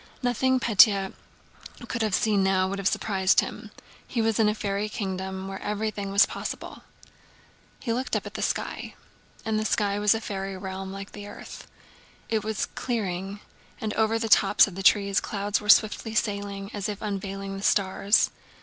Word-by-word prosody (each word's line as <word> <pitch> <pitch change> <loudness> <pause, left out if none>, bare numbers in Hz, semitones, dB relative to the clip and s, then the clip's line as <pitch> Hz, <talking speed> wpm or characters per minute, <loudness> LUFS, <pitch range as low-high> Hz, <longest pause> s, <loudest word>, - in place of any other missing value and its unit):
Nothing 255 +2 +2
Pétya 200 -4 +5 0.7
could 235 - -3
have 215 -3 +1
seen 210 -3 +2
now 190 -1 +2
would 195 +1 -3
have 195 - 0
surprised 190 -3 +2
him. - - -7 0.4
He 240 - -3
was 225 -1 +1
in 215 -1 +5
a 210 - -1
fairy 205 0 -2
kingdom 190 -2 -4
where 195 - -6
everything 210 -1 -3
was 200 +2 +6
possible. - - -6 1.0
He 230 - -2
looked 255 +3 -2
up - - -1
at - - -8
the - - -5
sky. - - -3 0.5
And 220 -1 0
the - - -1
sky 205 -1 0
was 210 +1 +4
a - - -1
fairy 195 -3 -5
realm 190 0 -6
like 195 0 -8
the 205 0 -9
earth. 205 - -10 0.6
It 220 -2 0
was 220 -1 -1
clearing, 200 -4 -3 0.4
and 215 -1 -3
over 220 0 +2
the 225 0 -2
tops 210 - +6
of 200 - -8
the 195 - -5
trees 200 0 +4
clouds 205 0 -1
were 210 - -8
swiftly 220 +1 +4
sailing 200 -1 -2
as 205 -1 -3
if 205 -1 -4
unveiling 195 -1 -4
the 195 - -6
stars. 200 +1 +3
205 Hz, 175 wpm, -26 LUFS, 195-215 Hz, 1.0 s, was